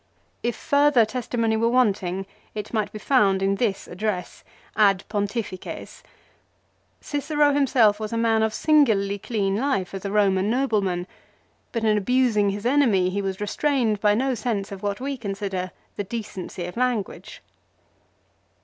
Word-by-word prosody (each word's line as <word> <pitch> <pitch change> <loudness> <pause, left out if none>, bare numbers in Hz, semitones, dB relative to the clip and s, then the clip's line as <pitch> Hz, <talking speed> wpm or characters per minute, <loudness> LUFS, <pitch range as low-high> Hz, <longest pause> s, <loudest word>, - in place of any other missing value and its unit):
If 240 -1 -1
further 285 -4 +3
testimony 230 -1 -1
were 230 +1 +2
wanting 195 -6 +1 0.3
it 210 +1 -6
might 215 -3 0
be - - -7
found 205 -5 +2
in 195 0 +1
this 205 -4 -1
address 180 -1 -4 0.2
" - - -29
Ad 195 -1 -2
Pontifices." 205 -2 -4 1.0
Cicero 290 0 +1
himself 245 -7 +3
was 215 -1 -4
a 230 - -1
man 225 -1 +2
of 220 0 +2
singularly 215 -9 +2
clean 200 -3 -1
life 230 -8 -1
as 195 - -6
a 200 - -3
Roman 200 -1 +2
noble 240 -3 +1
man, 180 -2 -2 0.7
but 230 -2 -2
in 215 -1 +3
abusing 220 -2 +2
his 205 +2 -4
enemy 235 -9 +3
he 200 +2 -1
was 195 -1 -3
restrained 220 0 0
by 210 -1 +4
no 260 +3 +1
sense 215 -4 -2
of 195 -1 -7
what 205 -1 -2
we 275 +1 -3
consider 195 -4 -4 0.3
the 205 - -1
decency 200 -4 -6
of 180 +5 -8
language. 245 -5 -2
215 Hz, 155 wpm, -24 LUFS, 195-245 Hz, 1.0 s, by